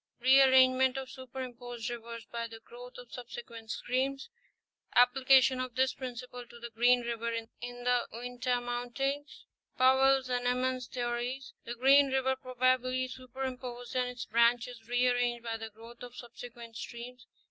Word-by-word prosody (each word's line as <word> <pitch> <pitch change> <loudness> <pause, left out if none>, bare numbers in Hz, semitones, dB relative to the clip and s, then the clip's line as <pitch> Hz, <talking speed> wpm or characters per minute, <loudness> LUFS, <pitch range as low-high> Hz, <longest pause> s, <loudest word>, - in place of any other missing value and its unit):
—Re 260 +2 +6
arrangement 260 0 +5
of 265 -1 -5
superimposed 245 -2 -7
rivers 230 -1 -7
by 235 -1 -4
the 225 0 -11
growth 245 +2 -12
of 245 -1 -12
subsequent 235 -2 -9
streams.—Application 265 - +1
of 255 -2 -4
this 260 +1 +2
principle 250 -1 -7
to 235 - -13
the 235 0 -8
Green 245 +2 +4
river 235 -1 -3
in 230 0 -3 0.4
the 245 0 +2
Uinta 245 +2 -2
mountains: 245 +4 -3 0.3
Powell's 265 +1 +5
and 245 -1 -1
Emmons' 255 0 0
theories. 245 +2 -3
—The 240 - -5
Green 275 +3 +6
river 265 0 +1
probably 255 0 +1
superimposed 255 -1 -6
and 250 -1 +1
its 250 -1 -6
branches 235 0 +2
re 245 +1 +2
arranged 245 -1 +1
by 225 -1 -3
the 225 0 -7
growth 230 +2 -14
of 245 0 -9
subsequent 235 -1 -10
streams. 240 +1 -8
245 Hz, 145 wpm, -31 LUFS, 240-260 Hz, 0.4 s, Re